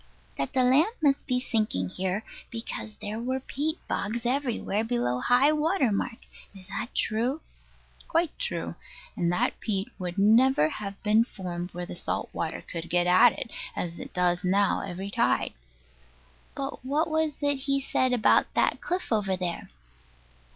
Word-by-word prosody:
That 135 - -3
the 255 - +3
land 295 - +4
must 285 -4 +2
be 250 -1 +1
sinking 215 - -1
here, 190 - -2 0.3
because 225 -2 -5
there 210 +1 -5
were 260 +3 -1
peat 300 +4 -2
bogs 225 +4 -2
everywhere 240 -5 0
below 225 - 0
high 245 - +4
water 305 - +2
mark. 230 +4 -3 0.3
Is 190 0 -13
that 240 - -5
true? 240 +8 0 0.7
Quite 330 -1 +1
true; - - -2 0.4
and 170 0 +1
that 175 - 0
peat 195 -2 -1
would 180 0 -4
never 220 - +5
have 200 +2 -6
been 215 +1 +5
formed 180 -5 -6
where 175 0 -3
the - - -7
salt - - -2
water - - -3
could 165 -1 -6
get 175 0 +2
at 185 +7 +6
it, 230 - -6 0.2
as 170 -1 -3
it - - -7
does 180 -1 +1
now 195 +2 +2
every 195 +1 -5
tide. - - +1 1.0
But 270 -1 -5
what 295 +5 +1
was 315 -2 -1
it 285 -1 +2
he 275 0 +3
said 260 -1 +1
about 245 -3 +4
that - - +2
cliff 360 -4 -2
over 195 -4 +1
there? 180 -2 -3
225 Hz, 160 wpm, -27 LUFS, 185-270 Hz, 1.0 s, at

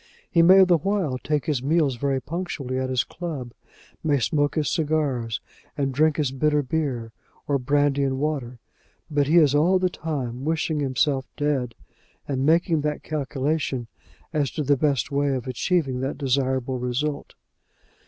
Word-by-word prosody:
He 170 - +5
may 190 +3 +8
the 175 -3 +4
while 180 -8 -1
take 150 0 -1
his 150 -6 0
meals 145 -1 +2
very 135 +1 0
punctually 145 -5 -4
at 130 0 -2
his 130 -2 +1
club, 150 -9 -6 0.5
may 145 -2 +2
smoke 145 +3 +1
his 155 -3 0
cigars, 145 - -1 0.4
and 135 -2 0
drink 155 +2 +2
his 145 -4 0
bitter 150 +2 +1
beer, 130 -5 -2 0.4
or 140 -1 +1
brandy 145 +2 +2
and 135 -1 0
water; 135 -4 -2 0.5
but 145 -2 +2
he 160 +4 +4
is 150 -5 +5
all 165 +6 +4
the 185 -1 +1
time 135 -7 -4
wishing 160 0 0
himself 135 0 0
dead, 140 -5 -1 0.5
and 135 0 -1
making 165 0 +3
that 150 0 -2
calculation 140 -3 -2 0.5
as 145 -4 +1
to 155 - -3
the 145 +1 +3
best 140 -1 0
way 140 -1 +1
of 125 - -4
achieving 130 +1 0
that 135 +2 -3
desirable 130 -2 0
result. 140 +4 -3
145 Hz, 160 wpm, -24 LUFS, 130-155 Hz, 0.5 s, may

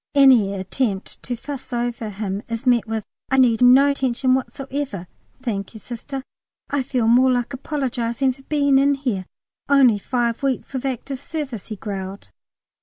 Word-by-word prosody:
Any 250 -8 +6
attempt 195 +1 -2
to 245 - -4
fuss 270 +3 -8
over 240 -2 -2
him 200 -1 -3
is 230 +3 -4
met 240 -3 +3
with 220 -1 -2 0.3
"I 265 - +2
need 245 -3 +4
no 260 +3 +7
attention 260 -1 +1
whatever, 265 -6 -3 0.4
thank 205 -3 -3
you, - - -8
Sister. 250 +4 -6 0.5
I 285 -1 +1
feel 250 -3 0
more 255 +3 +5
like 245 +1 -1
apologising 260 -2 -1
for 270 - -18
being 280 -1 +3
in 280 +1 +4
here. 235 -10 -2 0.4
Only 260 -7 +5
five 235 +1 -1
weeks 275 0 -1
of 265 0 -2
active 265 +1 -4
service," 280 - -5
he 215 - -5
growled. 195 - -6
250 Hz, 160 wpm, -22 LUFS, 225-270 Hz, 0.5 s, no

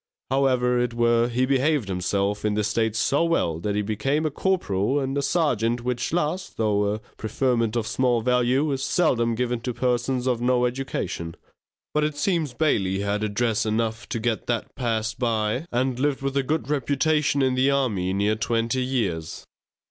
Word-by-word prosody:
However, 125 -2 +2
it 120 -1 -1
were, 120 0 +3
he 125 +1 +1
behaved 135 -2 +1
himself 100 +2 -1
in 105 -1 +1
this 105 0 0
state 110 0 0
so 140 +7 +2
well 85 - 0
that 100 +4 -2
he 105 - 0
became 125 +9 -1
a 155 - 0
corporal 135 - 0
and 135 +1 -1
serjeant, 120 -7 +1
which 125 -1 -2
last, 175 +2 -2
though 105 -2 +1
a - - -6 0.2
preferment 115 0 0
of 115 -2 0
small 120 +1 +1
value, 125 +4 +2
is 135 -1 -2
seldom 120 -8 +1
given 125 0 -1
to 120 0 -4
persons 125 0 0
of 125 -2 0
no 125 0 +2
education. 120 -9 -3 0.6
But 150 - +2
it 150 -1 -1
seems 160 -6 0
Bailey 100 -11 +1
had 100 +1 -1
address 110 +1 0
enough 110 +1 -2
to 115 - -2
get 115 0 -2
that 120 -2 -2
passed 115 -2 -2
by, 115 +4 0
and 125 +1 0
lived 140 0 0
with 135 0 -2
a 140 - +3
good 155 +4 -2
reputation 145 0 +1
in 130 -1 +2
the 130 +2 +3
army 115 -10 0
near 100 +3 +1
twenty 115 +3 0
years. 100 -11 -2
120 Hz, 175 wpm, -24 LUFS, 110-135 Hz, 0.6 s, were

